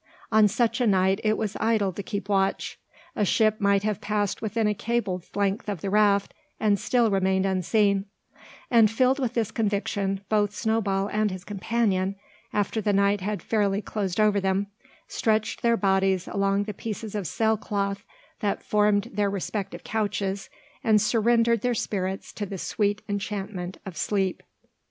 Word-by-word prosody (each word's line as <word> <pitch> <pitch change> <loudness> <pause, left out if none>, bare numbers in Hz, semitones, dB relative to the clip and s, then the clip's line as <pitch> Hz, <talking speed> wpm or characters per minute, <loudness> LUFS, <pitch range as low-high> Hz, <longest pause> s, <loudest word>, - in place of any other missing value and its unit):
On 215 -1 +6
such 230 +3 0
a 245 - +3
night 190 0 +3
it 215 0 +2
was 215 -3 -2
idle 220 -4 +1
to 200 - -5
keep 200 0 -5
watch. 195 -1 0 0.4
A - - +1
ship 215 +2 +2
might 200 0 +3
have 210 -2 -1
passed 205 -2 -1
within 220 +1 -1
a 210 - +2
cable's 205 -5 -2
length 200 +1 0
of 195 -6 -4
the 195 - -3
raft, 205 -1 +3 0.3
and 205 -2 +2
still 240 -3 +2
remained 190 0 +2
unseen; 195 +1 +2 0.7
and, 230 -3 +6
filled 255 +5 +2
with 250 -3 -2
this 225 -4 0
conviction, 200 -2 -1
both 210 -1 +1
Snowball 210 -4 0
and 215 0 +2
his 185 -1 -6
companion, 200 -1 0 0.4
after 210 +2 0
the 205 0 +1
night 200 0 +2
had 205 +2 -3
fairly 205 -3 +1
closed 205 -3 -3
over 210 -1 +4
them, 190 +1 0 0.4
stretched 220 -1 0
their 235 -1 +3
bodies 190 -2 +2
along 200 0 +1
the 210 0 -5
pieces 215 +1 -6
of 205 -5 -2
sail 220 +5 +1
cloth 200 -1 -2 0.4
that 205 -1 -1
formed 210 +1 +2
their 205 0 +1
respective 200 +1 -4
couches, 200 -2 -2 0.3
and 215 -1 +4
surrendered 230 +1 +3
their 245 0 +1
spirits 190 -3 -3
to 205 - -4
the 195 - -5
sweet 205 +2 -1
enchantment 195 -2 -4
of 190 -3 -7
sleep. 190 +4 -1
205 Hz, 165 wpm, -26 LUFS, 195-220 Hz, 0.7 s, On